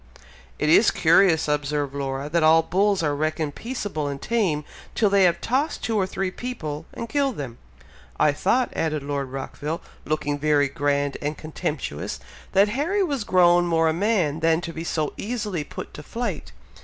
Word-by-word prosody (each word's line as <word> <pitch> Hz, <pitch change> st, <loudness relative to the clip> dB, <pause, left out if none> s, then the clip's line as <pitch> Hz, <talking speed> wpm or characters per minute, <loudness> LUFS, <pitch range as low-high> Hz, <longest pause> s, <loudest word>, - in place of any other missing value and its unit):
"It 150 Hz, -, 0 dB
is 185 Hz, +8 st, +6 dB
curious," 165 Hz, 0 st, +4 dB
observed 145 Hz, -1 st, -1 dB
Laura, 135 Hz, 0 st, -3 dB
"that 165 Hz, +3 st, +1 dB
all 160 Hz, +1 st, +6 dB
bulls 195 Hz, +1 st, +1 dB
are 145 Hz, -2 st, +1 dB
reckoned 155 Hz, 0 st, -1 dB
peaceable 205 Hz, -, -4 dB
and 140 Hz, -1 st, -4 dB
tame, 185 Hz, -10 st, 0 dB, 0.3 s
till 210 Hz, -3 st, +3 dB
they 200 Hz, -1 st, +5 dB
have 175 Hz, -, +2 dB
tossed 275 Hz, +6 st, -1 dB
two 225 Hz, -, -1 dB
or 195 Hz, -3 st, +2 dB
three 190 Hz, 0 st, -2 dB
people, 160 Hz, -11 st, -5 dB
and 230 Hz, -, -6 dB
killed 275 Hz, 0 st, 0 dB
them!" 125 Hz, -5 st, -6 dB, 0.6 s
"I 150 Hz, -, +5 dB
thought," 245 Hz, -, +1 dB
added 155 Hz, -3 st, -1 dB
Lord 140 Hz, -2 st, -3 dB
Rockville, 145 Hz, +4 st, -4 dB, 0.2 s
looking 145 Hz, -1 st, -1 dB
very 145 Hz, -1 st, +3 dB
grand 140 Hz, 0 st, 0 dB
and 150 Hz, +1 st, -2 dB
contemptuous, 150 Hz, -, -4 dB, 0.3 s
"that 200 Hz, +2 st, +5 dB
Harry 325 Hz, -, 0 dB
was 280 Hz, -, -1 dB
grown 175 Hz, -2 st, +4 dB
more 165 Hz, -1 st, +3 dB
a -, -, +1 dB
man 175 Hz, -5 st, +1 dB
than 165 Hz, 0 st, +3 dB
to 170 Hz, -1 st, -6 dB
be 160 Hz, -, -5 dB
so 155 Hz, -3 st, -1 dB
easily 210 Hz, -7 st, -3 dB
put -, -, -8 dB
to -, -, -8 dB
flight. 210 Hz, -, -4 dB
160 Hz, 175 wpm, -24 LUFS, 145-205 Hz, 0.6 s, is